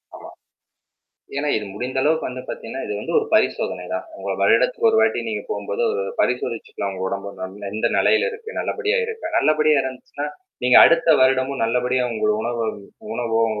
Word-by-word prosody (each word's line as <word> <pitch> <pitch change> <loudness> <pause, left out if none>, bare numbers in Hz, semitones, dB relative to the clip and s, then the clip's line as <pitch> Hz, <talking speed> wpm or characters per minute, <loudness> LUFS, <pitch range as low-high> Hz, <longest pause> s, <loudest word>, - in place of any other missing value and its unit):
ஆமா. - - -11 1.1
ஏன்னா 145 +1 -1
இது 105 - -2
முடிந்த 125 +4 -3
அளவு 160 +2 +3
வந்து - - -5
பார்த்தீங்கன்னா, - - -6
இது 425 - -4
வந்து - - -5
ஒரு 440 - -1
பரிசோதனைதான். 330 +1 0
உங்கள - - -4
வருடத்துக்கு 465 -2 +3
ஒரு 445 - +2
வாட்டி - - +2
நீங்க - - -3
போகும்போது 480 +2 -3
ஒரு 455 +2 -1 0.2
பரிசோதிச்சுக்கலாம் 115 -5 -2
உங்க 95 0 -5
உடம்பு 100 +1 -4
நல்ல 100 +1 -6
எந்த 110 - 0
நெலையில 455 +2 +3
இருக்கு, 450 0 -9
நல்லபடியா 450 +1 -1
இருக்கா? 450 -8 -5
நல்லபடியா 155 -1 +3
இருந்துச்சுன்னா, 130 +2 -6 0.4
நீங்க 125 0 +6
அடுத்த 165 0 +4
வருடமும் 130 0 +2
நல்லபடியா 125 +2 +1
உங்கள் 105 -1 +1
உணவு 120 0 -2 0.5
உணவோ, 115 -2 -1
உங்க 105 -1 -3
130 Hz, 165 wpm, -22 LUFS, -, 1.1 s, நீங்க